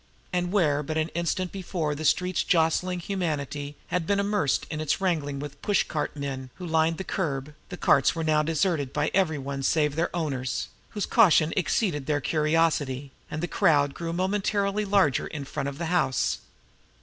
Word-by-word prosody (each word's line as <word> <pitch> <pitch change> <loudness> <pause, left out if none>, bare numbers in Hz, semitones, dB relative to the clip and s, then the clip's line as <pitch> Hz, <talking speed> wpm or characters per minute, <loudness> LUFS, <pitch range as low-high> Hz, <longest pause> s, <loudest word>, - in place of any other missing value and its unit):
And 180 0 0
where 155 -8 +2
but 155 +2 -3
an 160 +1 0
instant 170 +2 -1
before 175 -5 -2
the 155 +2 -5
street's 180 +4 +2
jostling 175 +1 +1
humanity 150 -6 -3
had 180 -2 -1
been 200 0 +2
immersed 200 -8 +1
in 155 -1 -3
its 155 - 0
wrangling 155 -7 0
with 145 +1 -5
the 145 - -23
push 205 - +2
cart 150 -2 -3
men 135 -3 -5
who 180 - -7
lined 160 0 +2
the - - -4
curb, 150 -7 -3 0.2
the 180 - -6
carts 140 -3 +4
were 165 - -2
now 155 -1 +3
deserted 155 -2 0
by 150 0 0
every 175 -5 +2
one 140 0 -4
save 150 +1 +2
their 165 +2 +1
owners, 135 -6 -2 0.2
whose 205 - -2
caution 165 -8 +5
exceeded 175 - 0
their 150 -1 +1
curiosity 150 -3 +1 0.2
and 155 +2 -4
the - - 0
crowd 145 -8 +3
grew 165 +3 -4
momentarily 200 +3 0
larger 195 -9 +2
in 150 -3 -6
front 140 0 -3
of 140 - -8
the 170 - -3
house. 160 -7 +1
160 Hz, 185 wpm, -26 LUFS, 145-180 Hz, 0.2 s, caution